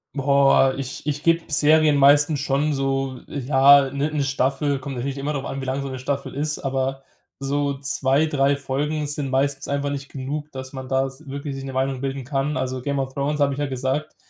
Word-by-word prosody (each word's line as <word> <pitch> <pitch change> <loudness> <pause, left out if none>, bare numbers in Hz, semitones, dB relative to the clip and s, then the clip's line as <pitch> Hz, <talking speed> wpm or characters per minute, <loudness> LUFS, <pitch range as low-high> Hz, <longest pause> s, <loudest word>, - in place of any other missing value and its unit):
Boah, 140 -1 +4
ich 135 +1 -6
ich 150 0 -2
gebe 165 0 +3
Serien 150 0 +4
meistens 145 +2 +5
schon 145 +2 0
so, 135 -2 -1
ja, 140 0 +5
'ne 140 +3 -1
'ne 145 -2 0
Staffel. 135 +1 0
Kommt 135 0 -6
natürlich 135 +3 -3
immer 140 +2 -2
drauf 140 -2 -3
an, 135 - -5
wie 135 - -5
lange 135 +1 -2
so 135 - -4
'ne 130 -1 -6
Staffel 140 +1 -3
ist. 150 +2 -2
Aber 135 0 -2 0.4
so 140 0 -1
2, 140 +1 +1
3 140 -2 +2
Folgen 145 +2 -2
sind 145 -1 -3
meistens 135 +1 0
einfach 140 0 -1
nicht 140 0 -5
genug, 145 +3 -5
dass 130 0 -7
man 130 -2 -7
da 135 0 +1
s 135 +3 -13
wirklich 140 +1 -5
sich 135 0 -6
'ne 135 - -6
Meinung 130 0 -1
bilden 135 0 -3
kann. 140 +3 -1
Also 130 -1 -2
„Game 140 +1 -2
of 135 0 -3
Thrones“, 145 +2 -1
habe 140 0 +3
ich - - -7
ja 145 - 0
gesagt, 135 +3 -2
140 Hz, 215 wpm, -23 LUFS, 135-145 Hz, 0.4 s, meistens